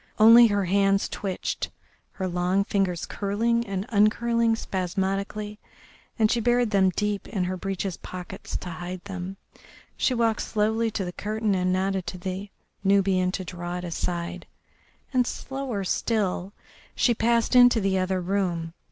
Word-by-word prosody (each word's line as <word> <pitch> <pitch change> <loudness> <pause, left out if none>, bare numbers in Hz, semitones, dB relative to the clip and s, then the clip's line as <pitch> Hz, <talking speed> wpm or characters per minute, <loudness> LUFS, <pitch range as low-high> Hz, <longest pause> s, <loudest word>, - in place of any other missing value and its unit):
Only 230 +2 +9
her 205 -2 0
hands 195 +1 +2
twitched, 190 -3 -3 0.4
her 190 -2 -3
long 180 +2 +1
fingers 195 -4 0
curling 230 +3 0
and 195 0 -3
uncurling 230 +1 +3
spasmodically, 195 +2 -3 0.6
and 220 -2 +3
she 240 - +2
buried 240 0 +2
them 195 -2 +4
deep 210 -1 -1
in 195 -5 -2
her 185 +1 -2
breeches' 195 0 -3
pockets 180 -1 -7
to 180 - -7
hide 175 +2 -6
them. 190 -1 -6 0.6
She 255 - +1
walked 230 -2 +1
slowly 220 +1 0
to 205 -3 -3
the 180 - -4
curtain 215 +2 -1
and 185 -1 +1
nodded 190 0 0
to 180 - -4
the 190 +2 -5 0.3
Nubian 190 -2 +3
to 190 - -3
draw 175 0 -5
it 180 - -6
aside, 175 0 -4 0.7
and 250 -1 +3
slower 265 -7 -4
still 195 -2 -1 0.4
she 240 - +3
passed 235 +2 +1
into 245 -2 +7
the 195 -2 +1
other 185 0 0
room. 175 -3 -1
195 Hz, 150 wpm, -26 LUFS, 185-220 Hz, 0.7 s, Only